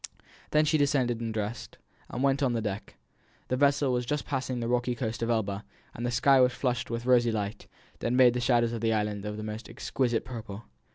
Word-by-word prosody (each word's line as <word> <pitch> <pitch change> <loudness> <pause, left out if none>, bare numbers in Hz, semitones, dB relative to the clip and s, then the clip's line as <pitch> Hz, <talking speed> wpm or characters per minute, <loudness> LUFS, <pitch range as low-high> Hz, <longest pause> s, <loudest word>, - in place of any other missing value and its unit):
Then 155 0 +3
she 155 0 +2
descended 130 -5 +1
and 115 -1 -2
dressed, 110 +1 -4 0.3
and 125 - -3
went 140 0 +2
on 130 -3 +2
deck; 105 -3 -4 0.5
the 130 - +1
vessel 140 0 +3
was 125 0 0
just 150 +4 -2
passing 130 -3 -2
the 115 - -2
rocky 120 0 0
coast 115 -1 -3
of 115 - -1
Elba, 105 -3 -1 0.3
and 120 - -6
the 120 - 0
sky 135 +2 +4
was 125 0 +4
flushed 125 -2 -1
with 115 +1 -3
rosy 120 -2 +4
light, 105 0 -4 0.3
that 120 - -1
made 125 -1 +6
the 125 - -1
shadows 120 -2 +2
on 115 - -3
the 115 0 +1
island 105 -1 -1
of 105 0 -4
the 110 - -5
most 110 +1 -6
exquisite 120 0 -1
purple. 110 -4 -7
120 Hz, 215 wpm, -28 LUFS, 110-130 Hz, 0.5 s, made